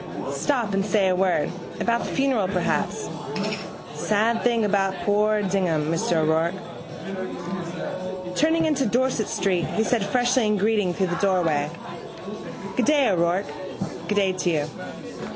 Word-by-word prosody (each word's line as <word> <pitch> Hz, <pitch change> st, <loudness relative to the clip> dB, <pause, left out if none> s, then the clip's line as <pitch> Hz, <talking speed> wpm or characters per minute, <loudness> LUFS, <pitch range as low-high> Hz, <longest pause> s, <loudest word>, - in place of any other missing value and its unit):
Stop 240 Hz, -8 st, 0 dB
and 195 Hz, 0 st, +2 dB
say 195 Hz, -1 st, +2 dB
a 185 Hz, -, +2 dB
word: 185 Hz, -4 st, +2 dB, 0.3 s
about 235 Hz, 0 st, +1 dB
the -, -, -4 dB
funeral 265 Hz, -8 st, +2 dB
perhaps. 185 Hz, -2 st, -1 dB, 0.9 s
Sad 220 Hz, +2 st, +1 dB
thing 235 Hz, -3 st, +3 dB
about 195 Hz, -2 st, +1 dB
poor 210 Hz, +1 st, +2 dB
Dignam, 175 Hz, -6 st, +1 dB
Mr 165 Hz, +1 st, +1 dB
O'Rourke. 160 Hz, +3 st, +2 dB, 1.8 s
Turning 320 Hz, -, +3 dB
into 285 Hz, -5 st, +2 dB
Dorset 245 Hz, -1 st, +1 dB
street 185 Hz, -3 st, +1 dB
he 220 Hz, -, 0 dB
said 225 Hz, -2 st, +1 dB
freshly 245 Hz, +2 st, +2 dB
in 210 Hz, 0 st, +2 dB
greeting 205 Hz, -2 st, +2 dB
through 190 Hz, -, +1 dB
the 175 Hz, -1 st, -1 dB
doorway: 165 Hz, -7 st, +2 dB, 1.1 s
—Good -, -, +3 dB
day, 295 Hz, -2 st, +5 dB
Mr 220 Hz, -, +3 dB
O'Rourke. 175 Hz, +2 st, +2 dB, 0.6 s
—Good 210 Hz, -, 0 dB
day 195 Hz, -2 st, +3 dB
to 185 Hz, -1 st, 0 dB
you. 150 Hz, -3 st, +1 dB
200 Hz, 140 wpm, -24 LUFS, 180-230 Hz, 1.8 s, day